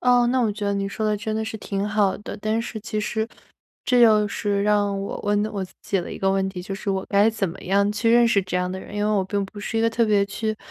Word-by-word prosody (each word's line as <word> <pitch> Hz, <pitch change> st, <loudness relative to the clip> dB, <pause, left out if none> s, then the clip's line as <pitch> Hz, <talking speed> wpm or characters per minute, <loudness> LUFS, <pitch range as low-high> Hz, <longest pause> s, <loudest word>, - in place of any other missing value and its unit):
哦， 245 Hz, -1 st, +4 dB
那 255 Hz, +1 st, +2 dB
我 230 Hz, -3 st, +2 dB
觉 210 Hz, 0 st, -5 dB
得 200 Hz, -, +1 dB
你 195 Hz, 0 st, -1 dB
说 215 Hz, +2 st, -4 dB
得 210 Hz, 0 st, +1 dB
真 215 Hz, +1 st, -3 dB
的 220 Hz, 0 st, -1 dB
是 220 Hz, 0 st, -5 dB
挺 200 Hz, -1 st, -3 dB
好 210 Hz, -2 st, +1 dB
的。 205 Hz, -, -7 dB
但 215 Hz, +2 st, 0 dB
是 230 Hz, -1 st, -5 dB
其 215 Hz, 0 st, -3 dB
实， 220 Hz, +1 st, -1 dB, 0.6 s
这 250 Hz, -1 st, +3 dB
又 215 Hz, -3 st, +6 dB
是 200 Hz, -1 st, -1 dB
让 205 Hz, -1 st, +2 dB
我 195 Hz, -, -4 dB
问 205 Hz, 0 st, +1 dB
的 215 Hz, -, -2 dB
我 200 Hz, -2 st, -3 dB
自 185 Hz, -, -15 dB
己 195 Hz, -, 0 dB
了 175 Hz, -, -4 dB
一 -, -, -7 dB
个 195 Hz, -, +2 dB
问 195 Hz, 0 st, +1 dB
题， 180 Hz, -2 st, -6 dB
就 195 Hz, +1 st, -5 dB
是 195 Hz, -, -6 dB
我 190 Hz, -1 st, -1 dB
该 200 Hz, +2 st, +4 dB
怎 215 Hz, -4 st, -1 dB
么 170 Hz, +4 st, -9 dB
样 200 Hz, +2 st, +2 dB
去 225 Hz, +2 st, +1 dB
认 240 Hz, 0 st, +6 dB
识 230 Hz, -4 st, +3 dB
这 185 Hz, 0 st, -3 dB
样 180 Hz, 0 st, -1 dB
的 190 Hz, -, -4 dB
人？ 195 Hz, -, -10 dB
因 205 Hz, 0 st, 0 dB
为 210 Hz, -, +1 dB
我 200 Hz, -3 st, +2 dB
并 200 Hz, +1 st, -1 dB
不 205 Hz, +2 st, -12 dB
是 215 Hz, +2 st, -4 dB
一 -, -, +2 dB
个 230 Hz, -, +3 dB
特 230 Hz, +1 st, +2 dB
别 205 Hz, -2 st, +3 dB
去 215 Hz, +2 st, -3 dB
205 Hz, 325 characters per minute, -23 LUFS, 195-220 Hz, 0.6 s, 又